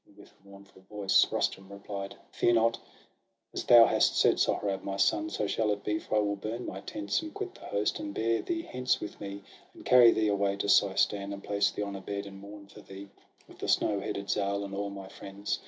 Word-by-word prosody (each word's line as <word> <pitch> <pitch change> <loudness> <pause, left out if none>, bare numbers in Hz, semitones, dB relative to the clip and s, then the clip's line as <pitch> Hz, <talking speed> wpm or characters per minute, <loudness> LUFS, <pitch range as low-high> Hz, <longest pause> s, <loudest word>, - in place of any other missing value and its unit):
And, 100 - -24
with 100 - -16
a 100 - -26
mournful 100 -1 -16
voice, 100 -2 +3
Rustum 95 +1 -2
replied: 100 0 -7
— - - -34
'Fear 120 - +2
not! 115 0 +2 0.7
as - - -3
thou 120 -2 +9
hast - - +2
said, - - +4
Sohrab, 95 -2 0
my 100 0 -4
son. 105 +2 +2
So 105 - -2
shall 110 +1 0
it 105 -1 -2
be; 105 0 -1
for - - -4
I 105 - +4
will 100 0 -1
burn 110 +4 -5
my - - -6
tents, 310 0 -3
And 320 -1 -7
quit 400 -1 -6
the - - -14
host, 105 +1 -1
and 100 - -5
bear 115 +2 0
thee 335 -1 -3
hence 125 - -1
with 105 - -8
me, 100 0 -7 0.3
And - - -14
carry 125 -2 +7
thee 110 -2 +2
away 100 -1 +1
to 100 - -3
Seistan, 100 0 +2
And 100 - -9
place 100 0 +1
thee 105 - -4
on 100 -1 -5
a 95 - -7
bed, 100 +1 -5
and 95 -1 -10
mourn 100 +1 -11
for 100 - -15
thee, 95 +1 -11 0.4
With - - -17
the - - -4
snow 100 -1 +2
headed 100 0 -4
Zal, 100 0 -1
and 100 0 -7
all 100 +1 -3
my 100 -1 -8
friends. 100 +1 -5
100 Hz, 235 wpm, -29 LUFS, 100-105 Hz, 0.7 s, thou